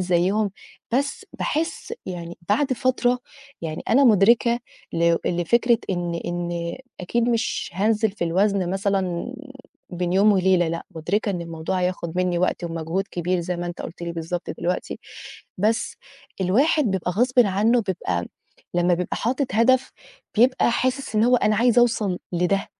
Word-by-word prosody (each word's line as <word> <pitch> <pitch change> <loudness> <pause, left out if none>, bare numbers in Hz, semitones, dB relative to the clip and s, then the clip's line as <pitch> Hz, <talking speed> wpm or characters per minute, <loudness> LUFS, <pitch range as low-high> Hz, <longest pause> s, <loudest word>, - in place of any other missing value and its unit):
زيّهم، 185 +4 +1 0.4
بس 275 +3 -1
باحس 330 +8 -3
يعني 175 -2 -6
بعد 260 +7 +2
فترة 250 0 +1 0.4
يعني 160 -1 -4
أنا 275 +5 +5
مُدركة 235 +2 +5 0.3
لو 170 0 +3
لفكرة 235 +7 +2
إن 175 -2 -2
إن 175 -1 -3 0.2
أكيد 235 +6 0
مش 235 -1 -1
هانزل 215 +3 +2
في 195 -3 -3
الوزن 190 +1 +1
مثلًا 195 +2 -1 0.6
بين 180 -1 -2
يوم 200 +3 +5
وليلة 185 -3 +3
لأ، 165 +1 -4
مُدركة 200 +7 -1
إن 180 -3 -3
الموضوع 165 +2 -3
هياخُد 180 -2 -2
منّي 180 -1 +1
وقت 180 0 0
ومجهود 165 +3 -2
كبير 180 +1 -1
زي 175 +1 -3
ما 175 - -4
أنت 175 0 -6
قُلت 175 - -8
لي 170 0 -3
بالضبط 170 +1 -4
دلوقتي، 180 +1 -2 0.6
بس 220 +4 0 0.5
الواحد 275 - +3
بيبقى 185 -2 -1
غصبٍ 250 +6 +1
عنّه 215 +5 +2
بيبقى 130 - -2 0.5
لمّا 175 0 +3
بيبقى 180 +1 -3
حاطط 255 +5 0
هدف، 255 +3 +3 0.4
بيبقى 245 +2 +4
حاسِس 255 0 -1
إن 215 - +4
هو 250 +1 +5
أنا 215 -3 +2
عايزة 240 +1 +4
أوصل 215 -6 +1
لده. 180 +3 +1
190 Hz, 145 wpm, -23 LUFS, 175-230 Hz, 0.6 s, أنا